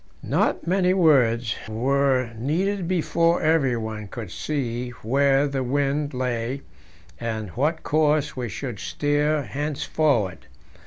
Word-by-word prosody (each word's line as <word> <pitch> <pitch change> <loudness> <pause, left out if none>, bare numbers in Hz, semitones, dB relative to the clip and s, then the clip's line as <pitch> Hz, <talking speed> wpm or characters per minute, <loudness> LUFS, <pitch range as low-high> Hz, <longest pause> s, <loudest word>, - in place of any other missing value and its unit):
Not - - 0
many 185 +1 +2
words 125 -9 +3 0.2
were 130 +2 +1
needed 175 - -1
before 170 -1 +1
everyone 120 -9 0
could 105 -2 -7
see 125 -5 -3
where 135 +4 +3
the 140 -1 -2
wind 140 +2 0
lay, 125 +1 -2 0.6
and 110 -3 -3
what 150 - -1
course 150 -1 +2
we 125 -3 -3
should 115 +2 -5
steer 145 +1 0
henceforward. 140 -7 -1
140 Hz, 110 wpm, -24 LUFS, 120-150 Hz, 0.6 s, words